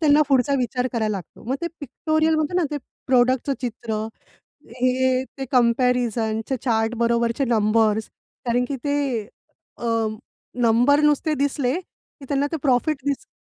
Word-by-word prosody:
त्यांना 300 -1 +5
पुढचा 270 0 +3
विचार 250 0 -1
करायला 220 -2 0
लागतो. 185 - -11
मग 250 +4 -1
ते - - 0
पिक्टोरियलमध्ये 315 +3 0
ना, 355 - +2
ते 295 - -2 0.3
प्रॉडक्टचं 255 +2 +3
चित्र, 225 -2 -3 0.7
हे 255 +1 +1
ते 270 - -2
कंपॅरिझनच्या 240 -1 +1
चार्ट 225 -2 +1
बरोबरचे 235 +2 +1
नंबर्स 220 -2 +2 0.4
कारण 245 +1 +2
की 280 - -2
ते 285 0 +1 0.8
अ, 240 - -4 0.8
नंबर 245 +6 +4
नुसते 305 +1 0
दिसले, 280 -2 0
की 315 -5 -20
त्यांना 280 0 +1
ते 325 - 0
प्रॉफिट 280 +3 +2
दिस 280 -1 -1
250 Hz, 135 wpm, -23 LUFS, 235-285 Hz, 0.8 s, त्यांना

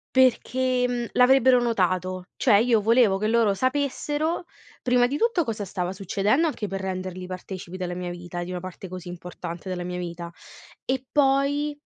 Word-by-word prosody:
Perché, 255 0 +3
mhmm, 245 -1 -2
l'avrebbero 255 0 +5
notato, 185 -5 0
cioè 235 -6 +4
io 225 +1 +4
volevo 225 -3 +4
che 215 - 0
loro 225 -3 +3
sapessero 290 - -1 0.4
prima 245 -1 +3
di 275 +4 -1
tutto 455 -6 +2
cosa 220 -5 -3
stava 180 0 -3
succedendo, 200 - +1
anche 255 -8 -3
per 195 0 -4
renderli 185 -1 -4
partecipi 185 0 -7
della 180 -1 -3
mia 180 0 -4
vita, 175 0 -6
di 175 - -7
una 180 -1 -3
parte 185 +1 -8
così 180 0 -8
importante 175 0 -7
della 180 -1 -3
mia 180 0 -4
vita. 170 -1 -6 0.5
E 260 0 -2
poi, 285 +1 +2
205 Hz, 165 wpm, -25 LUFS, 180-260 Hz, 0.5 s, l'avrebbero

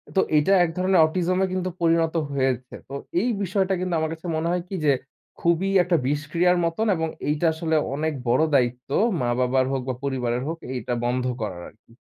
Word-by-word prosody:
তো 190 - +4 0.2
এটা 170 +7 +3
এক 170 - 0
ধরনের 185 -1 +3
অটিজমে 185 +3 0
কিন্তু 185 0 -1
পরিণত 165 0 +2 0.2
হয়েছে। 130 -2 -1 0.2
তো - - -8 0.3
এই 245 - 0
বিষয়টা 190 0 0
কিন্তু 180 -1 -2
আমার 160 0 -1
কাছে 165 +2 -9
মনে 160 +1 -1
হয় 180 - 0
কী 195 - -4
যে 145 - +5 0.5
খুবই 170 +3 +1
একটা 175 0 +1
বিষক্রিয়ার 160 +5 +1
মতন 165 +7 -1
এবং 160 0 -1 0.2
এইটা 150 +3 0
আসলে 160 0 -1 0.2
অনেক 155 +1 -1
বড় 125 +6 +3
দায়িত্ব 125 -1 0 0.3
মা-বাবার 125 +2 +1
হোক 135 -1 -1
বা 130 - 0
পরিবারের 125 -2 -1
হোক, 165 +1 -3 0.2
এইটা 125 0 -3
বন্ধ 125 +1 0 0.2
করার 95 -5 -4
আরকি। 115 +2 -25
160 Hz, 185 wpm, -24 LUFS, 130-180 Hz, 0.5 s, যে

